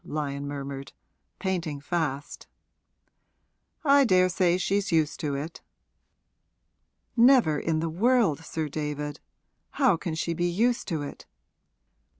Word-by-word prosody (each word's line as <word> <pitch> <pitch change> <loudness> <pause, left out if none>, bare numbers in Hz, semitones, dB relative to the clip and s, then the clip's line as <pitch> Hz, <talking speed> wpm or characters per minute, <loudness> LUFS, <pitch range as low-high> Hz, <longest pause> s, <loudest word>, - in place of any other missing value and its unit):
Lyon 145 -2 -4
murmured, 140 -1 -6 0.4
painting 175 -7 -2
fast. 145 -2 -3 1.4
'I 280 -2 +5
daresay 185 -3 +3
she's 195 +1 0
used 160 -2 +1
to 145 -2 -2
it.' 155 +4 -6 1.5
'Never 235 - +5
in 160 -1 -1
the 165 - -1
world, 205 - +2
Sir 160 -1 -3
David. 150 0 -4 0.5
How 260 - +3
can 165 -1 -4
she 165 +1 -1
be 175 +2 0
used 230 +7 +1
to 160 -6 -2
it?' 145 - -9
165 Hz, 115 wpm, -27 LUFS, 145-190 Hz, 1.5 s, I